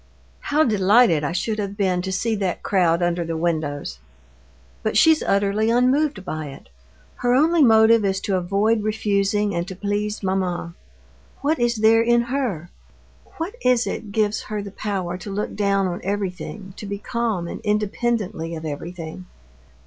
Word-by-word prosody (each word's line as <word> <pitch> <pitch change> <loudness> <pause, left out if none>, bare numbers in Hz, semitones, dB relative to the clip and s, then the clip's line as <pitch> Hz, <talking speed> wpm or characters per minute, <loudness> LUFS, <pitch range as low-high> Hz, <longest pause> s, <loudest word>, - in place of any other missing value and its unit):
How 300 +2 +2
delighted 205 - +4
I 145 - -1
should 215 +5 -2
have 200 -1 -4
been 185 -3 +1
to 190 +1 -4
see 225 +5 0
that 190 -3 -2
crowd 175 -3 +2
under 175 0 0
the 165 -1 -3
windows! 155 - -2 0.8
But - - 0
she's 315 +7 +5
utterly 200 +2 +1
unmoved 250 -2 +2
by 155 -3 -4
it. 135 - -12 0.5
Her 245 0 +2
only 320 +4 +4
motive 225 -3 +6
is 195 -1 0
to 195 - -1
avoid 200 +5 +1
refusing 205 -1 0
and 170 +1 -2
to 190 - -7
please 205 +2 -2
mamma. 185 -3 -1 0.7
What 300 +4 +1
is 240 0 +1
there 220 +1 +4
in 235 +1 +3
her? 235 - -3 0.7
What 330 +6 -4
is 250 -1 +3
it 210 - -5
gives 210 0 0
her 210 -1 -5
the 200 - -8
power 185 -4 -3
to 205 - -8
look 205 +2 -3
down 200 -1 +1
on 180 -1 -3
everything, 195 0 -4
to 210 - -7
be 200 0 -3
calm 220 -5 -2
independently 210 -4 -2
of 160 0 -7
everything? 165 +3 -7
200 Hz, 160 wpm, -22 LUFS, 180-225 Hz, 0.8 s, motive